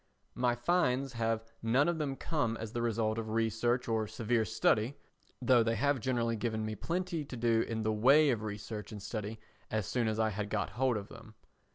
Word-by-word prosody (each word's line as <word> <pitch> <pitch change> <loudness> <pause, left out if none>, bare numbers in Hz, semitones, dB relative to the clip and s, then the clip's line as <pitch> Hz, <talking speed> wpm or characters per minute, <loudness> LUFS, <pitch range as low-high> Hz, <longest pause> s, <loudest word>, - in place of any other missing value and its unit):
My 125 -1 +1
finds 135 -2 +1
have 115 -1 0 0.2
none 125 +7 +3
of 170 -2 0
them 140 -3 -1
come 135 -7 -1
as 110 -1 -6
the 120 - -1
result 115 -1 0
of 110 -1 -4
research 115 +2 +1
or 110 -2 0
severe 110 +1 0
study, 110 +6 +2 0.4
though 125 -1 +5
they 115 0 +1
have 140 0 +1
generally 115 -1 0
given 110 -1 -2
me 110 - -3
plenty 170 - -2
to 135 -3 -8
do 115 -1 +3
in 110 -1 -2
the 110 0 +1
way 135 +7 +5
of 115 -3 -1
research 105 0 -6
and 105 - -6
study 105 +1 -5 0.3
as 110 -2 -1
soon 120 +4 0
as 110 0 -1
I 110 -1 +3
had 105 +1 -3
got 110 - -1
hold 125 -1 +1
of 100 0 -7
them. 110 -1 -13
115 Hz, 205 wpm, -32 LUFS, 110-125 Hz, 0.4 s, though